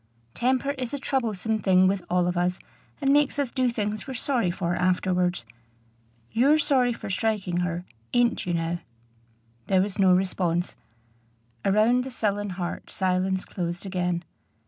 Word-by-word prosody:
"Temper 260 +3 +1
is 255 +2 -3
a - - -2
troublesome 225 -6 -1
thing 185 -2 +4
with 190 -1 0
all 180 0 +2
of 180 0 -1
us, 180 +1 +1 0.4
and 275 -1 +3
makes 290 -1 +3
us 280 -4 0
do 255 -2 +1
things 215 -1 -3
we're 265 - -5
sorry 245 -7 +1
for 175 -1 -1
afterwards. 180 -4 +1 0.9
You're 275 +6 +4
sorry 260 -5 +3
for 225 - -5
striking 195 -3 0
her 175 0 -2 0.3
ain't 240 -5 +2
you, 175 - 0
now?" 165 +1 -1 0.9
There 190 - +3
was 200 -1 -5
no 190 -1 +5
response. 180 -2 0 0.9
Around 220 +5 +3
the 265 - -6
sullen 205 -4 -1
heart 175 -2 -4
silence 190 0 0
closed 175 0 -4
again. 180 -2 -1
195 Hz, 150 wpm, -26 LUFS, 180-240 Hz, 0.9 s, no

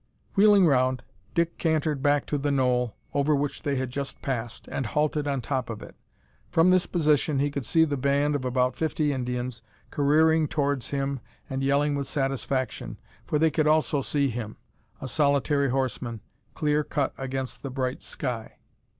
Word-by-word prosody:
Wheeling 205 -2 +6
round, 130 -4 +2 0.3
Dick 170 0 0
cantered 155 -3 0
back 145 0 +2
to 145 - -1
the 145 +1 0
knoll 125 -4 +1 0.2
over 145 +1 +2
which 145 0 -2
they 140 -1 -1
had 130 -1 -2
just 140 +1 -4
passed 120 -4 -4
and 130 - -2
halted 150 +3 0
on 140 -2 -1
the - - -13
top 130 -4 -1
of 110 -2 -6
it. - - -12 0.5
From 165 +3 +4
this 185 -1 +3
position 150 -3 +2
he 145 +1 +1
could 140 -5 -3
see 160 -1 +4
the 145 -2 -2
band, 140 +2 +2
of 145 -3 -1
about 125 0 +1
fifty 155 -2 0
Indians, 125 -2 -3 0.3
careering 155 +2 +3
towards 140 -4 -1
him 140 -1 -2 0.3
and 135 0 -3
yelling 140 +2 +2
with 140 -1 -2
satisfaction, 135 -2 -2 0.3
for 150 - +1
they 160 +1 +3
could 155 +1 +1
also 155 -2 +3
see 140 +1 +1
him 110 -3 -5 0.4
a 130 - -5
solitary 140 0 +2
horseman 125 -3 -2 0.3
clear 150 -1 +1
cut 145 -2 -1
against 135 -1 -4
the 135 - -5
bright 130 0 -2
sky. 120 -5 -4
140 Hz, 175 wpm, -26 LUFS, 130-150 Hz, 0.5 s, Wheeling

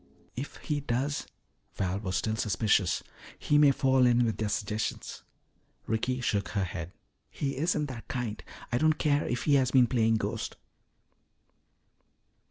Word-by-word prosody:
"If 135 +5 -5
he 150 -2 -3
does 140 +2 -2 0.2
" - - -44
Val 95 0 -1
was 95 -3 -3
still 110 +2 -1
suspicious. 100 -2 +1 0.3
"He 145 - +2
may 145 -1 +7
fall 130 -2 +3
in 120 0 +4
with 110 - -1
their 110 -1 -1
suggestions." 105 +1 -3 0.6
Ricky 125 +3 -1
shook 100 -4 0
her 100 - +2
head. 85 -1 -5 0.4
"He 140 -1 -3
isn't 155 0 +1
that 130 -5 -8
kind. 120 -4 -4 0.3
I 120 - +1
don't 155 +2 +4
care 145 -1 +1
if 125 - -2
he 145 - +2
has 130 - +1
been 130 -2 +5
playing 115 -2 +2
ghost." 110 - -3
120 Hz, 155 wpm, -29 LUFS, 105-135 Hz, 0.6 s, may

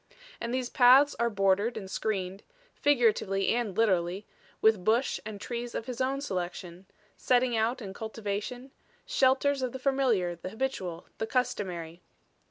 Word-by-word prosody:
And 235 - -4
these 255 0 -1
paths 265 +3 +6
are 235 0 +2
bordered 200 +2 +1
and 195 - -6
screened, 190 -1 -3 0.3
figuratively 220 -8 +2
and 225 -5 -1
literally, 190 -3 +1 0.3
with 220 -4 +3
bush 230 +6 +2
and 210 -2 -7
trees 240 +1 -5
of 225 - -3
his 250 0 -5
own 270 +2 0
selection, 180 -4 -5 0.3
setting 250 -1 +2
out 230 +3 0
and 195 -3 -7
cultivation 220 +4 -5 0.3
shelters 270 +1 +2
of 255 -2 -2
the - - -4
familiar, 255 -10 +1
the 170 +2 -7
habitual, 190 -7 -4
the 220 - -2
customary. 180 -9 -2
220 Hz, 145 wpm, -29 LUFS, 190-255 Hz, 0.3 s, paths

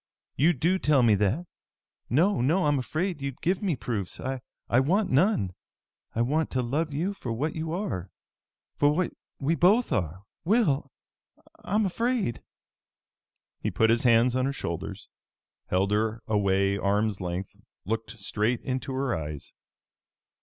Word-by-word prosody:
You 165 +5 +4
do 170 +8 +1
tell 145 -6 +4
me 115 -2 +5
that? 105 - +1 0.6
No, 165 +4 +3
no! 160 +8 +2
I'm 145 -2 +3
afraid 160 +5 -2
you'd 140 -2 -4
give 180 +2 0
me 190 -7 +1
proofs! 105 -8 -4
I 130 0 -3 0.4
want 185 +10 +2
none! 135 - +3 0.6
I 115 - +2
want 150 +5 +1
to 130 -1 -1
love 150 +6 -1
you 170 +8 -1
for 125 -11 -6
what 145 +7 -2
you 160 0 -3
are, 165 - -3 0.7
for 145 - +4
what 175 +4 0 0.3
we 145 +4 +1
both 200 +8 +4
are, 90 0 -1 0.2
Will! 160 - +2 0.7
I'm 210 +2 +1
afraid!" 230 - 0 1.2
He - - -1
put 110 0 +3
his 115 - +3
hands 120 0 +4
on 130 0 +2
her 140 - -1
shoulders, 95 -3 -5 0.6
held 95 +2 +1
her 110 +2 0
away 100 -1 +2
arms' 100 +1 +1
length, 90 +1 -5 0.2
looked 115 +3 -3
straight 110 +4 0
into 130 +1 -3
her 130 -1 0
eyes. 75 -2 -6
130 Hz, 145 wpm, -27 LUFS, 105-165 Hz, 1.2 s, me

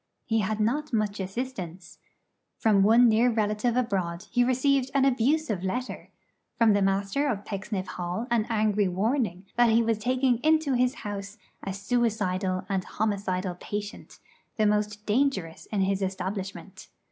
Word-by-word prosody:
He 225 -4 +1
had 215 +1 -1
not 280 +8 0
much 215 -2 0
assistance. 190 -4 -6 0.6
From 210 -3 +3
one 230 +5 +6
near 230 +2 +4
relative 220 +2 0
abroad 190 -6 -1
he 245 0 +3
received 260 +1 +2
an 275 -1 +4
abusive 260 - +1
letter; 250 +7 -4 0.5
from 230 -2 +5
the 200 - +2
Master 195 +8 +1
of 210 -6 -2
Pecksniff 200 -1 -4
Hall 180 +4 -4
an 225 -2 +2
angry 210 -2 +2
warning 195 0 -1
that 240 -1 +5
he 230 +1 +4
was 225 -1 0
taking 250 +1 +1
into 310 -1 +2
his 250 +2 +2
house 200 +1 -5 0.2
'a 195 - -4
suicidal 200 -4 -1
and 195 -2 -1
homicidal 195 -3 -2
patient, 205 0 -6 0.4
the 215 - +3
most 210 0 0
dangerous 210 -8 0
in 205 -3 -1
his 195 +1 0
establishment.' 190 0 -5
210 Hz, 145 wpm, -27 LUFS, 195-245 Hz, 0.6 s, one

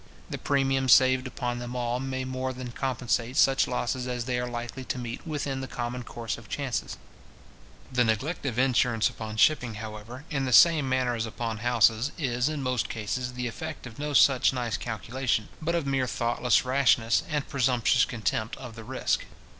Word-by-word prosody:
The - - -4
premium 135 -2 +1
saved 130 +1 +5
up 130 - -10
on 120 0 -1
them 120 +1 -6
all 120 0 -1
may 130 0 -3
more 130 0 -3
than 125 -1 -7
compensate 125 -1 -1
such 135 0 +4
losses 125 0 -2
as 125 -1 -3
they 125 -1 -1
are 125 0 -3
likely 120 +2 -5
to - - -3
meet 120 +4 -6
with 150 -2 -2
in 135 -2 -3
the 130 - -5
common 120 +1 -4
course 115 -2 -5
of 115 - -16
chances. 135 -4 -3 0.9
The 125 -1 +3
neglect 120 +9 -1
of 120 -3 -3
insurance 125 -3 +3
upon 110 -1 -7
shipping, 125 -3 +3
however, 110 +5 -8
in 140 -3 0
the 125 - -1
same 155 -4 +6
manner 130 -1 +1
as 115 -1 -2
upon 110 0 -4
houses, 115 +2 +3
is, 125 -3 0
in 150 -3 -3
most 125 -4 -1
cases, 120 +3 -3
the 125 0 -4
effect 155 +7 -6
of 120 0 -10
no 150 0 -3
such 135 -1 +5
nice 120 -3 -2
calculation, 115 0 -2
but 170 +2 0
of 165 -4 -1
mere 135 -2 0
thoughtless 120 0 +1
rashness, 125 -3 +3
and 150 -2 -1
presumptuous 125 -2 +2
contempt 110 -1 -2
of 125 -4 -9
the 115 - -9
risk. - - -1
125 Hz, 190 wpm, -27 LUFS, 120-135 Hz, 0.9 s, same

